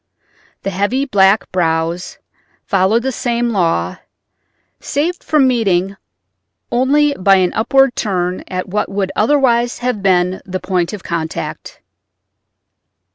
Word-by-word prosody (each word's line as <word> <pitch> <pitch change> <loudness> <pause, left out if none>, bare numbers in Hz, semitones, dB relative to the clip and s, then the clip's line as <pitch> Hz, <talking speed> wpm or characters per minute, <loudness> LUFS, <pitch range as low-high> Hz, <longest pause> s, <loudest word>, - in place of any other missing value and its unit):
The 195 - -2
heavy 205 +9 0
black 200 -4 +3
brows 165 0 -1 0.5
followed 195 +5 +2
the 265 - -1
same 240 -2 -1
law, 165 - 0 0.8
saved 335 +5 -2
from 300 -4 +3
meeting 195 -6 +1 0.8
only 285 +4 +2
by 195 -4 +3
an 185 -2 +1
upward 270 +3 +2
turn 180 -3 -2
at 185 0 -4
what 205 +3 -2
would 195 -1 -2
otherwise 240 -1 +2
have 245 -4 -2
been 185 -1 +1
the 185 0 -5
point 180 -3 -1
of 205 -3 -8
contact. 165 -1 -5
200 Hz, 120 wpm, -16 LUFS, 185-245 Hz, 0.8 s, black